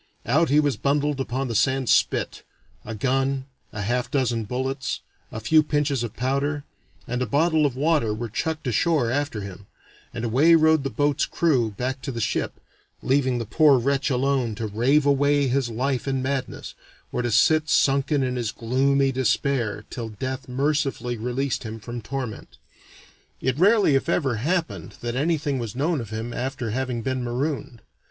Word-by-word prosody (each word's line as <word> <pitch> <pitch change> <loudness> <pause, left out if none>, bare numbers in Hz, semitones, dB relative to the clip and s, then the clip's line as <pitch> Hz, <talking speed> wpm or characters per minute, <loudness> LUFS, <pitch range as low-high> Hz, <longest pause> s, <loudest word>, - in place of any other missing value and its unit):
Out 155 +8 +2
he 145 +2 +5
was 145 -6 +1
bundled 145 +2 0
upon 135 0 -2
the 120 - -3
sand 130 +3 +1
spit; - - +1 0.4
a 115 - -6
gun, 135 +3 0 0.3
a 105 -2 -4
half 120 +3 -1
dozen 120 -5 0
bullets, 130 +2 -3 0.3
a 110 - -5
few 155 +8 +4
pinches 145 -3 0
of 115 - -5
powder, 140 +3 -1 0.4
and 125 +1 -2
a 125 - 0
bottle 155 +4 +3
of 130 - -6
water 145 -5 +1
were 115 +3 -3
chucked 155 +8 -3
ashore 125 +1 +1
after 140 -5 -1
him, 100 0 -9 0.4
and 120 -2 -4
away 140 +9 +5
rowed 160 -2 +4
the 135 - -1
boat's 145 +1 +1
crew 135 -9 +1
back 130 +1 -3
to - - -4
the 115 - -5
ship, 110 - -2 0.4
leaving 130 -2 +2
the 115 - -3
poor 145 +4 +5
wretch 135 +3 0
alone 130 -3 0
to 115 +1 -4
rave 125 +8 +2
away 145 0 +3
his 130 -1 0
life 130 +3 -2
in 135 -1 -1
madness, 130 -1 -3 0.4
or 125 - -1
to 120 - -1
sit 155 +7 +3
sunken 140 0 +2
in 125 -1 -1
his 115 -3 -2
gloomy 135 +3 +1
despair 125 -4 0
till 115 -3 -5
death 130 +4 -5
mercifully 135 -2 -1
released 125 +4 -2
him 110 -1 -6
from 120 +2 -7
torment. 125 -1 -6 0.8
It 130 +2 -1
rarely 200 -3 +5
if 135 +4 +1
ever 135 -9 +1
happened 165 +8 -2
that 120 0 -3
anything 145 -1 0
was 115 -3 -5
known 150 +2 0
of 115 - -8
him 110 +2 -5
after 130 -3 -3
having 125 -1 -2
been 130 0 -2
marooned. 125 -1 -3
130 Hz, 175 wpm, -24 LUFS, 120-145 Hz, 0.8 s, he